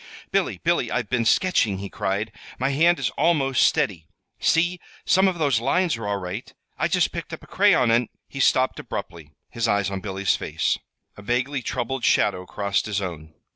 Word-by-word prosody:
"Billy, - - 0
Billy, - - 0
I've - - -2
been 120 -2 +1
sketching," 115 - +2
he 100 +1 -5
cried. 100 +4 -2 0.3
"My 130 +2 0
hand 165 +5 +3
is 120 -5 -1
almost 135 -5 +2
steady. 85 -6 +1 0.3
See, 175 +2 +2 0.3
some 190 +2 +4
of 185 -2 0
those 140 -7 +2
lines 165 +5 +1
are 115 -2 -6
all 100 0 0
right! 100 +8 -6 0.2
I - - 0
just 180 0 +1
picked 170 -1 -6
up 160 - -7
a - - -12
crayon 180 - +3
and 120 0 +2
" - - -57
He 135 - -8
stopped 130 0 +2
abruptly, 80 -3 -7 0.2
his 115 0 -1
eyes 100 -2 +1
on 95 - -3
Billy's 95 0 0
face. - - -1 0.4
A - - -10
vaguely 125 +5 -1
troubled 125 +2 -3
shadow 90 0 +2
crossed 100 +1 -1
his 105 -2 -1
own. 80 -5 -7
120 Hz, 190 wpm, -24 LUFS, 100-150 Hz, 0.4 s, some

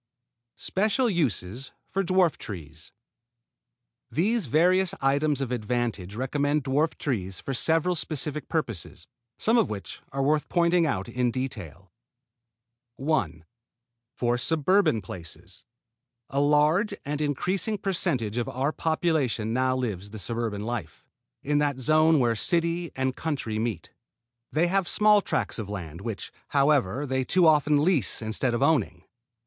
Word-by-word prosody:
SPECIAL 215 +5 +1
USES 130 - -2 0.2
FOR 195 - +1
DWARF 185 -2 +2
TREES 80 -6 -8 1.2
These 210 - 0
various 180 +7 +3
items 140 +1 +1
of 130 -3 -2
advantage 115 -4 -2
recommend 145 +4 0
dwarf 145 +4 +2
fruit - - -29
trees 95 -9 -3
for 135 - -4
several 165 +6 +1
specific 150 -2 -2
purposes, - - -3 0.3
some 230 +2 +3
of 225 - +2
which 100 -2 -6
are 135 0 -1
worth 150 +2 +1
pointing 170 -1 +3
out 95 -9 -2
in 125 -1 0
detail. 100 - -6 1.0
1. 95 - -1 0.7
For 120 0 0
suburban 160 - +2
places. 85 -3 -9 0.7
A 140 - 0
large 150 +8 +3
and 145 +1 -2
increasing 185 +9 -1
percentage 130 - -1
of 120 - -1
our 135 +4 -1
population 155 -10 0
now 130 +1 +1
lives 105 -6 -3
the 110 - -8
suburban 110 -1 -3
life 120 -2 -5 0.4
in 145 +1 +1
that 145 -3 0
zone 155 +4 +4
where 120 -3 +2
city 170 +6 0
and 130 -1 -1
country 130 -9 -3
meet. 110 -7 -3 0.6
They 160 +3 +2
have 190 +1 +1
small 210 +1 +4
tracts - - -2
of 105 -3 -5
land, 85 -4 -6
which, 110 -2 -5 0.2
however, 140 -3 +2
they 130 -1 0
too 180 +7 +3
often 150 -2 +4
lease 160 - +1
instead 115 +3 0
of 120 - 0
owning. 115 - +1
135 Hz, 135 wpm, -26 LUFS, 115-160 Hz, 1.2 s, zone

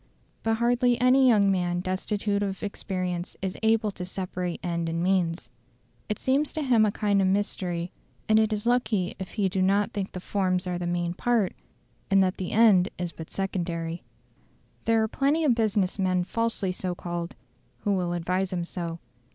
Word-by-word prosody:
But 225 0 +1
hardly 240 +1 +2
any 255 +2 +5
young 205 -5 +5
man 175 -2 0
destitute 200 +2 -1
of 195 -1 -3
experience 185 -3 -3
is 190 -1 -3
able 220 -1 +2
to 180 - -7
separate 180 -1 -4
end 170 -1 -1
and 165 0 -2
means. 180 -2 +1 0.6
It 210 - -1
seems 280 +3 +1
to 310 - -2
him 235 -5 +4
a - - +1
kind 200 -1 +1
of 190 - +3
mystery; 185 -3 -1 0.4
and 220 0 +5
it 220 0 +2
is 210 +1 -2
lucky 235 -6 +1
if 190 -1 -7
he 205 -3 +1
do 190 0 -1
not 200 +2 +2
think 200 -2 -2
that - - -32
the 180 - -4
forms 185 -1 0
are 180 -1 -2
the 175 - -3
main 175 0 -1
part, 225 -1 +1 0.6
and 195 0 +5
that 185 0 0
the 185 - -4
end 205 -5 +5
is 175 -1 -3
but 160 -1 -9
secondary. 170 -3 -3 0.8
There 225 -1 +3
are - - +1
plenty 280 +7 +1
of 280 -5 +4
business 210 -4 0
men 185 -1 +2
falsely 230 -1 -1
so 180 -1 -3
called, 175 0 -5 0.5
who 205 - 0
will 180 -2 0
advise 180 +2 -1
him 175 -2 -1
so. 170 -2 -5
190 Hz, 185 wpm, -27 LUFS, 180-220 Hz, 0.8 s, any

